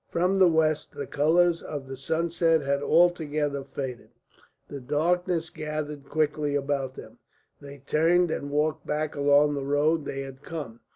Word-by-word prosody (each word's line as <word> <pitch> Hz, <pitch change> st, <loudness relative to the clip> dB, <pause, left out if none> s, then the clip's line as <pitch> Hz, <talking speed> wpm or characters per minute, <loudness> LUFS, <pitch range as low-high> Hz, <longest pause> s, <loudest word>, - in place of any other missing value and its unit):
From 180 Hz, +3 st, +1 dB
the 185 Hz, -, +7 dB
west 160 Hz, -2 st, +1 dB
the 140 Hz, -, -4 dB
colours 165 Hz, +5 st, +2 dB
of 145 Hz, -3 st, -6 dB
the 135 Hz, -, -6 dB
sunset 165 Hz, +3 st, +1 dB
had 140 Hz, 0 st, 0 dB
altogether 150 Hz, -4 st, +2 dB
faded, 130 Hz, -4 st, -6 dB, 0.6 s
the 140 Hz, -, -7 dB
darkness 165 Hz, +5 st, 0 dB
gathered 150 Hz, -3 st, -5 dB
quickly 150 Hz, -1 st, 0 dB
about 140 Hz, -2 st, -2 dB
them. -, -, -12 dB, 0.4 s
They 140 Hz, -1 st, -11 dB
turned 170 Hz, +3 st, +3 dB
and 145 Hz, -, -3 dB
walked 150 Hz, +2 st, -1 dB
back 150 Hz, 0 st, -2 dB
along 145 Hz, +1 st, +4 dB
the 140 Hz, -1 st, -3 dB
road 145 Hz, +3 st, +1 dB
they 135 Hz, -, -4 dB
had 135 Hz, 0 st, -9 dB
come. 145 Hz, -9 st, -7 dB
150 Hz, 155 wpm, -26 LUFS, 140-165 Hz, 0.6 s, the